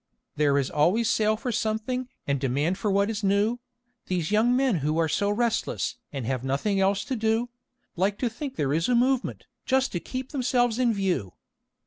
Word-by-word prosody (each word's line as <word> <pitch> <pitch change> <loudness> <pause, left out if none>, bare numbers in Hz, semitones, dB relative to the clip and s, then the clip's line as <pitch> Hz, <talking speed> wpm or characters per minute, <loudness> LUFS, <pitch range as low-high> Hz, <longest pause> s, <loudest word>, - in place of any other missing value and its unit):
"There 145 -1 +3
is 135 -2 0
always 185 +10 +2
sale 215 -1 +2
for 250 +2 -3
something, 235 +3 -2 0.2
and 140 -1 0
demand 145 +8 0
for 210 - 0
what 200 +1 +2
is 215 -1 -4
new. 205 +5 +2 0.5
These 175 -2 -1
young 225 +4 +3
men 260 -6 +2
who 150 +2 -1
are 165 -1 +2
so 200 +6 0
restless, 230 +3 -1
and 135 -5 -4
have 130 0 -2
nothing 145 +10 0
else 195 +1 +1
to 265 - -2
do, 225 +1 0 0.5
Like 195 +3 +1
to 250 - 0
think 265 +4 -5
there 140 - 0
is 165 +6 +1
'a 245 - +3
movement,' 255 +2 +1 0.2
just 265 +1 +1
to 175 - -2
keep 260 +7 -6
themselves 245 -4 +1
in 245 -2 +3
view. 185 - -1
210 Hz, 190 wpm, -26 LUFS, 165-245 Hz, 0.5 s, There